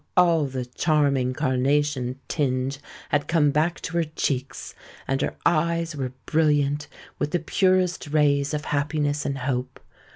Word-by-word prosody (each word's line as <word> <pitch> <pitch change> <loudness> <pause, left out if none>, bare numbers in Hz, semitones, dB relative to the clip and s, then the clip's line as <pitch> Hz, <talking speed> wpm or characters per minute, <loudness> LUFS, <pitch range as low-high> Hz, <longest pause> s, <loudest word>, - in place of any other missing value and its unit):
all 170 -4 +5
the 130 -1 -4
charming 140 -1 +1
carnation 130 0 0
tinge 135 -1 -1 0.3
had 145 0 +1
come 155 -3 +3
back 155 +4 +1
to 175 - -6
her 170 - +3
cheeks; 140 -4 -3 0.3
and 135 +1 0
her - - -1
eyes 170 0 +1
were 130 -3 -3
brilliant 150 -2 +1 0.3
with 145 - 0
the 175 - +1
purest 185 0 +1
rays 145 -1 +2
of 150 -1 -3
happiness 145 0 -1
and 140 -1 -2
hope. 130 -1 -3
145 Hz, 140 wpm, -24 LUFS, 135-155 Hz, 0.3 s, all